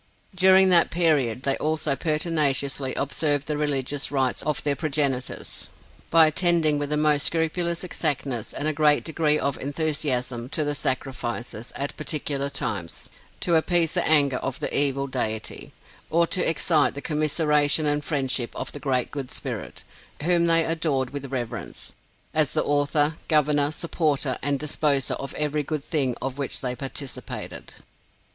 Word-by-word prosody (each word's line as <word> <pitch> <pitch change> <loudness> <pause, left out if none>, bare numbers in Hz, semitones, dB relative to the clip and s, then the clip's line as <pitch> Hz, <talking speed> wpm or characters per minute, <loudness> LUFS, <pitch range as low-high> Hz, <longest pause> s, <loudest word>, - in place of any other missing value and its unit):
During 190 +1 +6
that 175 -2 +6
period 145 -8 +1
they 135 -1 +2
also 155 -2 0
pertinaciously 145 -4 0
observed 145 +1 0
the 150 - -1
religious 145 -1 -1
rites 130 -3 0
of 150 -2 -2
their 145 -1 +1
progenitors, 140 -4 -2 0.4
by 165 -1 +7
attending 155 -2 +3
with 145 -1 -3
the 150 - 0
most 150 -1 +2
scrupulous 170 +1 -1
exactness 140 -9 -2
and 150 - -3
a 155 - +1
great 150 -1 +3
degree 155 -2 +1
of 140 -2 -2
enthusiasm 135 -5 -2
to 155 - -1
the 145 0 -1
sacrifices, 120 -4 -4
at 140 +1 -3
particular 145 -2 -2
times, 100 -10 -4 0.3
to 175 - +1
appease 165 0 +3
the - - +1
anger 140 -4 +4
of 130 0 -4
the - - -2
evil 140 -1 +2
deity, 110 -5 -3 0.4
or 170 +2 +3
to 180 +1 +1
excite 160 -3 +2
the 140 - -5
commisseration 150 0 +2
and 145 0 +1
friendship 130 -5 -1
of - - -4
the 145 - -8
Great 130 -4 -1
Good 140 -3 -5
Spirit, - - -6 0.4
whom 170 0 +3
they 165 -1 +5
adored 150 -6 -1
with 140 -1 -7
reverence, 120 -4 -5 0.4
as 155 -3 +1
the - - +1
author, 145 +2 +1
governor, 150 -1 +2
supporter 155 -5 -1
and 140 0 0
disposer 145 -2 0
of 140 - -6
every 150 0 0
good 150 0 -4
thing 140 -7 0
of 135 +1 -4
which 140 - -3
they 125 -1 -2
participated. 135 +1 -6
145 Hz, 150 wpm, -24 LUFS, 135-155 Hz, 0.4 s, by